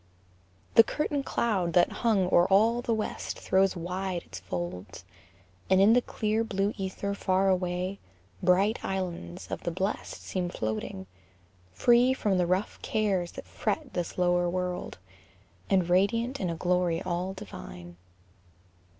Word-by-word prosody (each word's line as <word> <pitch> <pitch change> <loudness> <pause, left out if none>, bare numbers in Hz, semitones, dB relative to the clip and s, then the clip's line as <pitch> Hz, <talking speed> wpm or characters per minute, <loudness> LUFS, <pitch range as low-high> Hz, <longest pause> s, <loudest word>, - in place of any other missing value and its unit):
The 230 - +9
curtain 290 +3 -1
cloud 195 -10 0
That 175 +1 +4
hung 215 -6 +3
o'er 175 +1 +6
all 225 +5 +4
the 240 - -2
west 220 -2 -2
throws 190 0 +2
wide 180 +1 -3
its 95 - -9
folds, 90 +1 -6 0.6
And 190 0 +5
in 205 +3 +6
the 245 - +5
clear 220 -1 -1
blue 200 -1 -1
ether 195 +1 -3
far 190 -1 +1
away 185 +1 -1 0.4
Bright 195 +5 +3
islands 170 - -4
of - - -3
the - - -2
blest 190 +4 -3
seem 180 -2 -2
floating, 110 - -4 0.7
free 240 - +4
From 195 -7 +1
the 175 - +2
rough 185 +4 -1
cares 195 -5 0
that - - -8
fret 300 -5 -3
this 175 -2 -3
lower 175 -1 +2
world, 180 0 -3 0.7
And 185 -3 +3
radiant 230 +8 +2
in 185 - -1
a 165 - -2
glory 180 0 +1
all 180 +2 -2
divine. 85 - -10
185 Hz, 140 wpm, -28 LUFS, 175-210 Hz, 0.7 s, The